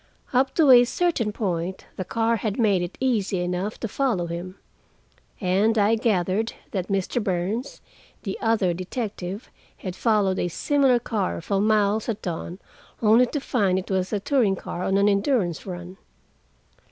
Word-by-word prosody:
Up 260 +1 +2
to 305 -5 +6
a 245 -1 +9
certain 250 -5 0
point 185 -4 -3
the 185 - -3
car 230 +4 0
had 210 0 -3
made 205 -6 +3
it 175 +1 -5
easy 215 -8 0
enough 180 +4 -3
to 230 - -1
follow 220 -6 0
him. 175 +3 -6 0.8
And 200 +4 +2
I 210 +1 +4
gathered 220 -1 0 0.2
that 185 -3 -2
Mr. 195 +4 -1
Burns, 195 +8 -2 0.4
the 195 -3 -3
other 215 -6 +2
detective, 190 +1 -5 0.3
had 185 -2 -6
followed 205 -5 +1
a - - 0
similar 270 - +2
car 220 -5 -2
for 195 +4 -1
miles 215 +1 +2
at 220 -2 -3
dawn, 170 0 -4 0.4
only 230 +3 +5
to 290 - -3
find 205 -9 +1
it 190 +1 -4
was 185 -1 0
a 210 - 0
touring 215 -2 +2
car 175 - -6
on 195 - +2
an 200 +1 +4
endurance 200 - +1
run. 180 0 -7
205 Hz, 160 wpm, -24 LUFS, 185-230 Hz, 0.8 s, a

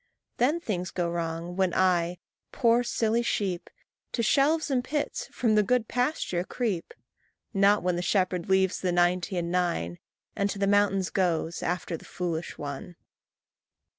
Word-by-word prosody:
Then 285 +8 +2
things 180 - -3
go 175 -2 -1
wrong, 170 +1 -3
when 190 -2 +1
I, 180 -2 +2 0.3
poor, 235 -1 +3
silly 230 -1 +1
sheep, 190 -6 -1 0.4
To 230 - 0
shelves 295 +6 +3
and 250 -2 +1
pits 300 - -2
from 230 -3 +1
the 210 - +5
good 225 +2 +1
pasture 245 - 0
creep; 200 -4 -3 0.6
Not 200 0 +4
when 180 -1 +1
the - - -1
shepherd 185 -1 0
leaves 190 -1 +3
the 185 - +1
ninety 175 +2 +1
and 170 0 -2
nine, 85 - -1 0.4
And 200 0 0
to 200 - -4
the 200 - +1
mountains 195 -2 +2
goes, 170 -3 0
after 175 -1 -2
the - - -15
foolish 170 -2 -4
one. 145 +4 -6
185 Hz, 155 wpm, -27 LUFS, 175-225 Hz, 0.6 s, the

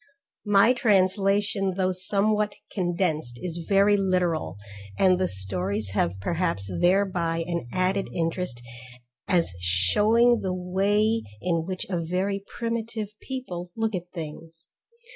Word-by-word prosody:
My 205 +4 +6
translation 195 -2 +2
though 185 -1 +2
somewhat 205 +3 0 0.2
condensed 170 - -1
is 170 -1 -4
very 200 +1 +5
literal, 180 - 0 0.4
and 185 -1 +4
the 185 - +2
stories 95 +2 -3
have 95 -1 0
perhaps 165 - -1
thereby 175 -3 +2
an 170 -7 -3
added 185 +4 0
interest 165 -7 -2 0.6
as 175 - +2
shewing 210 - +3
the 185 -1 -2
way 205 +5 +1 0.2
in 170 -2 0
which 185 -1 -4
a 175 -3 -2
very 190 +4 -1
primitive 230 -2 -3
people 185 -10 -6
look 225 -1 -1
at 180 -1 -4
things. 165 0 -8
185 Hz, 120 wpm, -26 LUFS, 165-200 Hz, 0.6 s, My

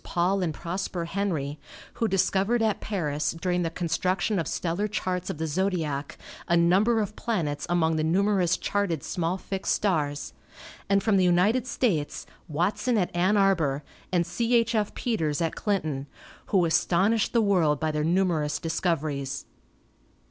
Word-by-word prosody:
Paul 185 +3 0
and 175 -3 0
Prosper 175 +2 -4
Henry, 165 -6 -2 0.4
who 225 - +3
discovered 195 +4 +1
at 215 -3 0
Paris, 150 -7 -1
during 180 0 0
the 165 - 0
construction 180 +4 0
of 165 - -2
stellar 175 +5 -1
charts 185 -4 -2
of - - -4
the 160 - -2
zodiac, 160 -4 -2 0.3
a 170 - +3
number 195 +7 +4
of 210 0 -4
planets 155 -11 -2
among 165 -2 +2
the 155 - 0
numerous 185 +1 +2
charted 195 -8 -1
small 175 +1 -1
fixed 195 0 -2
stars; 150 -8 -1 0.6
and 200 0 +3
from 215 -3 +3
the 185 - +4
United 195 +8 +3
States, 175 - -1 0.2
Watson 205 - 0
at 180 -3 -1
Ann 185 +4 +3
Arbor, 165 -8 +2 0.3
and 175 -2 +2
C. 235 +6 0
H. 230 0 +3
F. 210 -2 0
Peters 165 -11 -1
at 165 -1 0
Clinton, 155 -9 -2 0.4
who 190 -5 +3
astonished 190 +6 +2
the 235 - +3
world 175 -9 +2
by 155 0 0
their 150 0 -1
numerous 165 -3 +1
discoveries. 150 -5 -2
180 Hz, 155 wpm, -26 LUFS, 160-200 Hz, 0.6 s, number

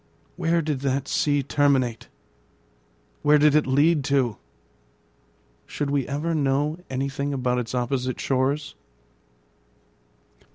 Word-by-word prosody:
Where 165 0 +1
did 150 -3 -2
that 135 0 -1
sea 145 -2 +1
terminate? 135 -4 +1 1.1
Where 150 0 +5
did 150 0 +4
it 150 -2 +3
lead 145 +3 +3
to? 135 -6 +1 1.3
Should 145 -1 -3
we 140 -3 0
ever 150 +4 -2
know 145 +2 0
anything 140 +2 -2
about 125 -1 0
its 125 +1 -4
opposite 125 +1 -2
shores? 140 +3 -1
140 Hz, 110 wpm, -24 LUFS, 130-150 Hz, 1.3 s, Where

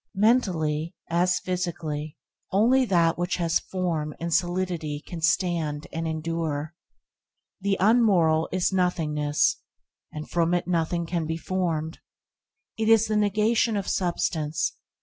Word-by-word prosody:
Mentally, 175 -8 +1 0.2
as 180 +1 +2
physically, 160 -5 -4 0.3
only 245 +7 +4
that 170 -5 +2
which 175 0 0
has 170 -1 +1
form 165 -5 -3
and 170 0 -2
solidity 175 -4 -1
can 170 -3 -7
stand 165 -3 0
and 165 0 -2
endure. 160 -1 -3 0.9
The 195 0 0
unmoral 190 -7 +3
is 185 +1 0
nothingness, 165 +1 +1 0.5
and 150 0 -7
from 170 0 +1
it 175 - -2
nothing 170 0 0
can 165 -1 -2
be 160 0 -2
formed. 165 -3 -2 0.8
It 220 0 +1
is 225 -1 +6
the 215 - -1
negation 210 +2 +2
of 200 - -3
substance. 165 -4 -1
175 Hz, 125 wpm, -26 LUFS, 160-190 Hz, 0.9 s, is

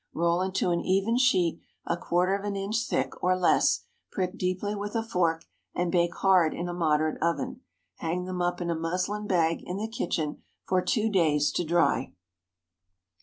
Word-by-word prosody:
Roll 170 +1 +2
into 185 -1 0
an 170 - +1
even 195 +5 +1
sheet, 185 -10 +2 0.2
a 170 - 0
quarter 180 +2 +1
of 200 - -5
an 205 -1 -2
inch 215 +4 -1
thick, - - -2
or 185 0 +3
less, 180 - +3 0.3
prick 185 0 -2
deeply 185 +1 -2
with 205 +2 -5
a 225 - +1
fork, 170 -7 0 0.3
and 175 -1 0
bake 170 -1 +1
hard 185 -5 +3
in 175 - -3
a 175 - -3
moderate 155 -2 +1
oven. 250 +10 -1 0.4
Hang 175 +2 -2
them 180 -1 -3
up 175 0 0
in 170 -1 -1
a - - 0
muslin 180 +6 -2
bag 165 -4 +2
in 180 - -5
the 215 +2 -2
kitchen 170 -8 -3 0.3
for 185 -1 +2
two 220 +3 +1
days 155 -8 +2
to - - -1
dry. 170 +1 +1
180 Hz, 180 wpm, -27 LUFS, 170-195 Hz, 0.4 s, or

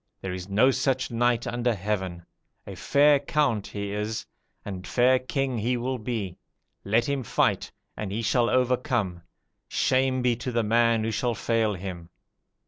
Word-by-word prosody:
There 95 -1 -4
is 90 +1 -6
no 115 +7 +4
such 130 -1 0
knight 120 0 +1
under 120 -1 0
heaven! 95 -3 -3 0.4
a - - -7
fair 145 0 +4
count 140 -7 0
he 100 -1 -5
is, 105 +2 -3 0.4
and 95 -3 -6
fair 130 +1 +4
king 130 -1 -2
he 120 +4 0
will 125 +1 -2
be. 105 -6 -4 0.4
Let 110 +4 +2
him 140 -1 -1
fight, 115 - 0 0.2
and 105 -3 -5
he 110 +3 -2
shall 120 +1 +2
overcome: 125 - 0 0.5
shame 130 -1 +1
be 125 -1 +3
to 125 +2 -4
the 115 -1 +1
man 115 +1 +3
who 115 - -1
shall 120 +2 -1
fail 110 -1 0
him.' 90 -2 -7
115 Hz, 160 wpm, -26 LUFS, 105-125 Hz, 0.5 s, no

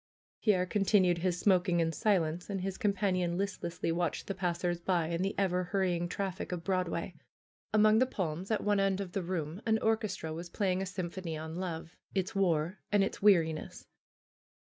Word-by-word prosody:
Pierre 190 -5 +3
continued 185 -3 +3
his 180 0 0
smoking 180 -3 +3
in 165 -1 +2
silence 170 -1 0
and 195 -2 -2
his 190 0 -3
com 205 - +3
panion 185 -3 0
listlessly 185 -3 -2
watched 170 -1 -1
the 195 - -3
passers 175 -1 -1
by 175 -1 +1
and 170 +2 -1
the 195 - -1
ever 180 -2 +1
hurrying 180 -2 0
traffic 190 0 -3
of 175 -2 -3
Broadway. 180 -1 -1 0.6
Among 215 +1 +5
the 255 - +4
palms 180 -4 -3
at 220 - 0
one 205 -1 +2
end 195 -1 +2
of 195 -3 -4
the 195 - -2
room 170 0 -3
an 220 -1 +2
or 220 0 +3
chestra 190 -7 -5
was 170 +2 -6
playing 190 0 0
a 195 - -2
symphony 180 -3 -4
on 160 +1 -6
love, 170 -2 -5 0.2
its 190 +3 0
war, 175 -2 +1
and 205 -1 +4
its 195 - -3
weariness. 165 -6 +2
185 Hz, 185 wpm, -32 LUFS, 170-195 Hz, 0.6 s, Among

